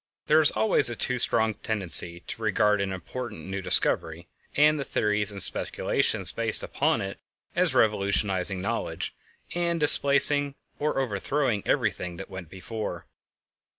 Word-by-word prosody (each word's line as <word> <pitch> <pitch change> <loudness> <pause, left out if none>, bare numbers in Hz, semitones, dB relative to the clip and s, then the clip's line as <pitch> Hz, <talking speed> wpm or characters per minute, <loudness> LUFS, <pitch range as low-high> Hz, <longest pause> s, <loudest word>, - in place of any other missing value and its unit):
There 155 +1 +3
is 155 - +6
always 110 +4 +4
a 120 - -5
too 125 +2 0
strong 110 -1 +1
tendency 90 -5 0
to 115 - -9
regard 105 -1 +1
an 95 -1 -3
important 100 0 -8
new 95 +1 -5
discovery 85 -2 +2 0.3
and 150 +1 +3
the - - -3
theories 105 -4 -1
and 100 -2 +2
speculations - - 0
based - - -1
upon - - -1
it - - -7 0.4
as - - 0
revolutionizing 100 -2 +1
knowledge, 100 - -4 0.4
and 170 -1 -2
displacing 145 -1 +4 0.2
or 150 -1 -2
overthrowing 125 0 -2
everything 90 -1 -2
that - - -10
went 95 -3 -9
before. 100 +4 -7
105 Hz, 140 wpm, -25 LUFS, 95-135 Hz, 0.4 s, is